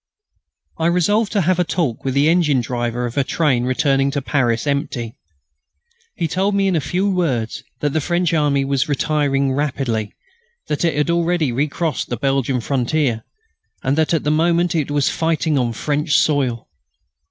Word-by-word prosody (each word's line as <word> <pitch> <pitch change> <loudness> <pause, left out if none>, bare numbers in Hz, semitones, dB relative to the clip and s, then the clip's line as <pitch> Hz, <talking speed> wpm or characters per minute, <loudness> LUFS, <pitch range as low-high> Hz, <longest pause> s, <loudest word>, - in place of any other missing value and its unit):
I 165 - +2
resolved 200 +5 +2
to 205 - +2
have 180 +1 +1
a - - +4
talk 160 -9 -2
with 135 -1 -2
the 140 +2 +3
engine 160 -5 +3
driver 120 0 -2
of 120 +3 -6
a 140 - +3
train 130 -4 +1
returning 135 +1 +1
to 140 +1 -2
Paris 120 -4 0
empty. 140 -5 -2 1.0
He 170 - -1
told 190 +5 0
me 195 0 +2
in 190 - +1
a 160 - +1
few 180 +8 -1
words 150 - -1 0.2
that 145 -1 0
the 160 - +1
French 175 +2 0
army 145 -3 +2
was 140 +2 0
retreating 140 -1 +1
rapidly, 130 -7 -2 0.6
that 150 - -1
it 165 - +1
had 150 +3 +1
already 170 -4 +1
recrossed 150 +4 -2
the 120 - -2
Belgian 135 0 0
frontier, 130 -2 0 0.6
and 135 - +1
that 160 0 +1
at 165 - +1
that 150 - +1
moment 170 +2 +2
it 155 -4 -1
was 145 -1 +1
fighting 160 -2 0
on 120 -2 0
French 145 +5 0
soil. 130 -4 +1
145 Hz, 175 wpm, -19 LUFS, 130-165 Hz, 1.0 s, a